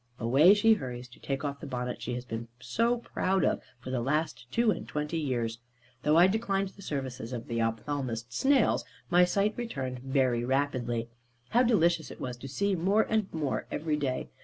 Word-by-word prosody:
Away 140 - +6
she 225 +2 +5
hurries 125 - -5
to 125 - -16
take 135 +1 -3
off 140 -1 -3
the 150 - -7
bonnet 125 -1 -4
she 125 - -3
has 125 0 -5
been 115 -1 -5
so 230 - +1
proud 190 -5 0
of, - - +1 0.2
for 130 - -7
the 125 -2 0
last 140 -2 -1
two 235 - +3
and - - -4
twenty 150 +2 -2
years. 120 -6 -2 0.4
Though 150 +3 +3
I 175 - +8
declined 195 -1 +1
the 200 - -16
services 130 -7 -4
of 120 -2 -5
the 115 0 -2
ophthalmist 115 +1 -2
snails, 270 - +3 0.3
my 180 +1 +6
sight 200 +4 +1
returned 135 - -4
very 130 -2 +1
rapidly. 120 -3 0 0.4
How 240 - +4
delicious 170 - +3
it - - -10
was 125 -1 -4
to 135 - -8
see 200 +9 0
more 195 +6 +3
and 220 -3 +1
more 150 -4 -2
every 155 0 -1
day! 135 -4 -2
140 Hz, 190 wpm, -29 LUFS, 125-190 Hz, 0.4 s, I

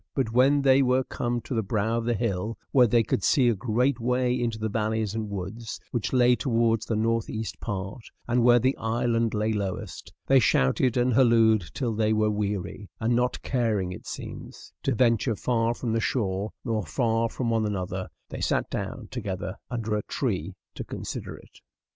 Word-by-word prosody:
But 130 -5 0
when 135 +3 +4
they 135 0 +5
were 130 0 +3
come 120 -1 -2
to 120 - -6
the 115 - +1
brow 110 +2 -1
of 115 - -4
the 120 0 +1
hill 105 -1 -2
where 125 -3 +6
they 115 +1 +3
could 100 - -1
see 130 -5 +4
a - - +3
great 120 +5 0
way 125 +1 +1
into 120 -3 -1
the 110 0 -2
valleys 110 -1 -1
and 110 -1 -3
woods, 100 +4 -5
which 120 -4 -2
lay 125 -1 +5
towards 115 -3 +1
the 115 - 0
northeast 110 0 -1
part, 100 +3 -4 0.3
and 120 +1 +2
where 120 0 +6
the 130 +3 +2
island 115 0 0
lay 110 +1 0
lowest, 100 -3 -4
they 135 0 +5
shouted 110 - +2
and 125 0 +2
hallooed 115 -5 +4
till 120 -5 -1
they 110 0 +1
were 110 0 +2
weary; 105 -1 -3
and 115 +1 +1
not 125 +1 0
caring, 110 -8 0
it 90 - -9
seems, - - -8
to - - 0
venture 115 -1 +2
far 115 +1 0
from 120 -2 -3
the 115 - +2
shore, 100 -4 -1 0.2
nor 115 -3 0
far 115 - 0
from 120 0 -2
one 110 -1 +1
another, 95 -2 -3 0.2
they - - -6
sat - - 0
down - - -4
together - - -4
under 110 -3 -2
a 105 - 0
tree 95 - -3 0.2
to - - -6
consider - - -6
it. - - -18
115 Hz, 190 wpm, -26 LUFS, 105-120 Hz, 0.3 s, where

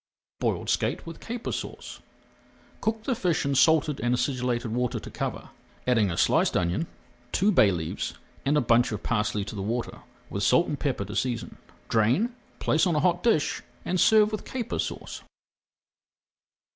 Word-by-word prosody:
BOILED - - -1
SKATE - - 0
WITH 165 -1 -8
CAPER 235 +1 -5
SAUCE - - -6 0.8
Cook 220 0 -1
the 260 - 0
fish 180 - 0
in 140 - +1
salted 155 +1 +4
and 120 +2 +1
acidulated 125 -2 -1
water 125 0 0
to - - -10
cover, - - -4 0.4
adding 115 -5 +3
a 85 - -3
sliced - - +3
onion, 90 - 0 0.4
two 205 +3 +3
bay 110 - +6
leaves, 80 -4 -3 0.3
and 145 +2 +2
a - - +4
bunch 120 0 +3
of 105 - -4
parsley 105 -3 0
to - - -7
the 100 - -4
water, 115 +4 -3 0.3
with 100 - -4
salt 170 +10 +4
and 145 - -3
pepper 130 -8 -1
to 105 +2 -7
season. 120 -3 -2 0.3
Drain, 125 - +2 0.2
place 155 +5 +2
on 170 - +1
a - - +3
hot 175 +1 +2
dish, 225 -11 +2 0.2
and 185 - 0
serve 215 +1 +5
with 215 - -3
Caper 245 -4 -4
Sauce. - - -4
130 Hz, 170 wpm, -27 LUFS, 115-175 Hz, 0.8 s, bay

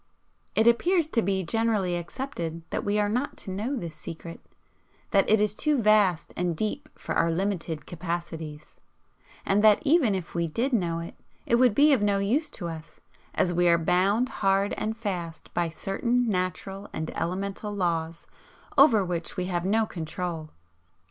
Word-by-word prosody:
It 220 - +4
appears 330 +8 +3
to 235 - +2
be 190 -1 0
generally 210 -2 0
accepted 170 - -5
that - - -2
we 205 +1 0
are 210 0 +2
not 245 +7 -2
to 190 - -6
know 215 +9 -2
this 170 -10 -5
Secret, 165 +1 -8 0.7
that 195 - +3
it 215 0 +5
is 210 -1 +2
too 295 +5 +1
vast 210 -6 +3
and 175 -2 -1
deep 275 - -2
for - - -5
our 165 - +2
limited 170 -3 -2
capacities, 165 -3 -5 0.7
and 205 +2 +2
that 215 -1 +7
even 280 - +4
if 180 -3 -5
we 170 -1 0
did 240 - -1
know 175 -7 +1
it, 170 0 -6 0.3
it 235 - +3
would 245 -4 +4
be 295 +1 +6
of 255 - +2
no 205 -1 +2
use 240 +11 0
to 175 - -6
us, 160 -1 -9 0.4
as 175 - +2
we 175 +1 +3
are 170 0 +5
bound 195 +9 +2
hard 195 0 +2
and 220 +1 -3
fast 180 -7 -5
by 170 -1 0
certain 235 +9 -1
natural 190 0 -3
and 160 0 -4
elemental 195 +5 -3
laws 170 -4 -2 0.5
over 230 -9 +6
which 175 +1 -4
we 180 - -1
have 175 -1 -2
no 220 +3 +2
control. 165 -3 -5
195 Hz, 170 wpm, -27 LUFS, 170-220 Hz, 0.7 s, that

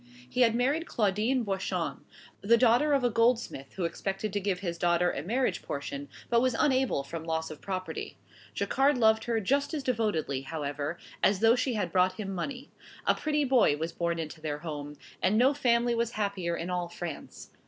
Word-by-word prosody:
He 250 - -1
had 230 -2 +5
married 280 +7 +1
Claudine 220 +4 +1
Boichon, 195 -2 -2 0.4
the 230 +4 +5
daughter 245 +5 +4
of 275 -2 +2
a 245 - +3
goldsmith 230 - +1
who 185 - -2
expected 195 +4 -3
to 205 - +1
give 195 -2 -1
his 170 -3 -3
daughter 175 +1 +2
a - - -4
marriage 240 - 0
portion, 140 0 -5 0.2
but 235 0 +3
was 255 -2 +1
unable 260 - +2
from 160 +3 -6
loss 160 -1 -2
of 155 - -10
property. 185 -4 -5 0.4
Jacquard 275 +1 +2
loved 220 -1 +4
her 230 -2 +1
just 280 - 0
as 290 - -3
devotedly, 210 - 0
however, 145 +2 -4 0.2
as 195 -1 +3
though 225 +1 +6
she 255 -1 0
had 210 - -1
brought 185 0 +3
him 195 0 -5
money. 255 +9 -5 0.3
A - - +5
pretty 300 -1 0
boy 250 - +4
was 160 +2 -3
born 170 0 -1
into 160 -1 -6
their 150 -2 -3
home, 150 -2 -6 0.2
and 195 +3 +3
no 260 +5 +5
family 240 -3 +2
was 235 0 -1
happier 200 -5 -1
in 175 +2 -4
all 175 -1 -2
France. 170 -2 -7
200 Hz, 190 wpm, -29 LUFS, 170-245 Hz, 0.4 s, though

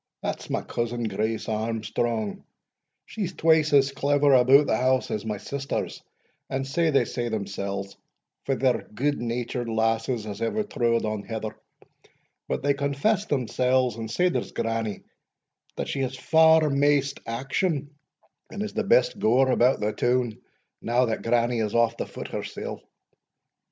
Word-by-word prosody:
that's - - -4
my - - -1
cousin, 120 0 -3
Grace 110 +1 -2
Armstrong, 110 0 -2 0.6
she's 190 -5 -4
twice 160 -1 +3
as 140 -1 +4
clever 145 +1 +2
about 130 +3 +6
the - - +1
house 130 +2 +1
as 110 +1 -3
my 105 -1 -2
sisters, 140 +6 -4 0.5
and 135 0 -2
sae 165 +4 +1
they 135 -5 +3
say 120 0 -3
themsells, 100 -2 -4 0.5
for 135 - 0
they're 130 -1 +1
good 145 +4 0
natured 120 0 -3
lasses 115 +1 0
as 105 +1 -6
ever 165 - 0
trode 115 - 0
on 110 -1 -2
heather; 110 0 -5 0.9
but - - -2
they 140 0 +3
confess 140 +10 0
themsells, 125 -2 +1
and 115 -1 -6
sae 180 +10 +2
does - - -3
grannie, 115 -3 -2 0.7
that - - -3
she - - -3
has 130 0 -2
far 160 +2 +5
maist 140 0 +2
action, 140 +5 -1 0.6
and 205 - -4
is 215 - -5
the 225 +1 -1
best 130 -11 +3
goer 130 +4 +3
about 125 +2 +3
the 105 +1 0
toun, 120 -2 0 0.4
now 120 +2 +2
that 115 -2 -2
grannie 120 0 +1
is 105 -1 -1
off 115 0 +3
the - - -3
foot - - -8
hersell. - - -5
125 Hz, 150 wpm, -26 LUFS, 115-140 Hz, 0.9 s, about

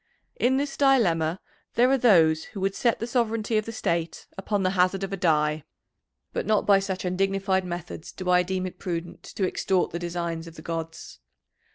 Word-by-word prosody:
In 260 +2 +3
this 280 0 -2
dilemma 185 - +3 0.4
there 245 +1 +5
are 270 - +4
those 165 -9 +4
who 195 - -8
would 195 0 0
set 235 +1 +1
the 230 - -3
sovereignty 230 -2 0
of 215 - -5
the - - -3
State 170 -6 -2
upon 200 +1 -1
the 185 - +2
hazard 185 +1 +2
of 195 0 -4
a - - +1
die. 155 -4 +1 0.7
But - - -2
not 215 -1 +2
by 200 -1 +5
such 190 -1 -4
undignified 195 +1 0
methods 175 -2 -6
do 185 - -7
I 180 0 +5
deem 185 +1 -2
it 185 - -7
prudent 175 -2 -5
to 195 - -3
extort 185 0 0
the 170 - -4
designs 170 -1 -4
of 165 - -11
the 155 - -11
gods. 165 - -6
185 Hz, 195 wpm, -26 LUFS, 170-205 Hz, 0.7 s, there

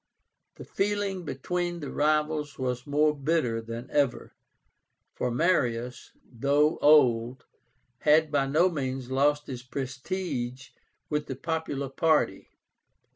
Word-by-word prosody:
The - - -10
feeling 200 -2 -1
between 175 +5 -3
the 145 - -6
rivals 150 -1 0
was 125 -1 -3
more 150 +1 +2
bitter 140 -6 0
than 115 +2 -7
ever, 140 -4 0 0.8
for 125 - -2
Marius, 125 -4 0
though 140 +5 +1
old, 125 -4 +4 0.5
had 155 0 +4
by 140 -2 +1
no 155 +6 +4
means 130 -6 -3
lost 145 +2 +2
his 125 -2 -6
prestige 130 0 -4 0.4
with 150 0 -1
the 135 - -4
popular 145 -1 -3
party. 155 +3 +1
145 Hz, 115 wpm, -27 LUFS, 130-155 Hz, 0.8 s, old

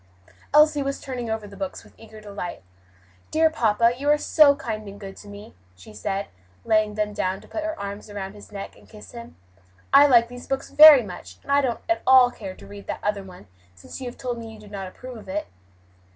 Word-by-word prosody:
Elsie 300 -1 +5
was 275 0 -3
turning 250 -4 -5
over 220 -1 -3
the 200 - -13
books 190 -1 -6
with - - -19
eager 220 -1 -14
delight. 200 - -7 0.7
"Dear 320 0 +3
papa, 230 -4 +2
you 280 +3 -2
are 295 - +5
so 295 -1 +5
kind 215 -5 -5
and 200 0 -10
good 195 -2 -9
to 205 - -13
me," 205 +1 -11 0.2
she 90 +3 -15
said, 195 - -4 0.4
laying 215 -1 +2
them 210 -1 -2
down 185 -1 -2
to - - -17
put 320 - -5
her 320 -5 -4
arms 200 +1 -7
around 195 -1 -6
his 205 0 -14
neck 200 -1 -8
and 100 -1 -20
kiss 105 -2 -13
him. 115 -9 -11 0.6
"I 285 +1 +8
like 235 -4 +5
these 245 +1 -11
books 270 0 -3
very 300 -4 +9
much, 180 -4 -10
and - - -6
I 285 0 +5
don't 250 -4 -2
at 335 - 0
all 255 -1 +7
care 195 -6 -8
to - - -14
read 200 0 -12
that - - -5
other 210 -1 -1
one 185 - -13 0.3
since 95 - -11
you 255 - -5
have 245 - -8
told 245 -2 -4
me 225 -1 -8
you 220 - -13
do 210 - -14
not 195 -2 -6
approve 250 +6 -10
of 210 - -13
it." 205 +2 -3
215 Hz, 230 wpm, -24 LUFS, 200-260 Hz, 0.7 s, very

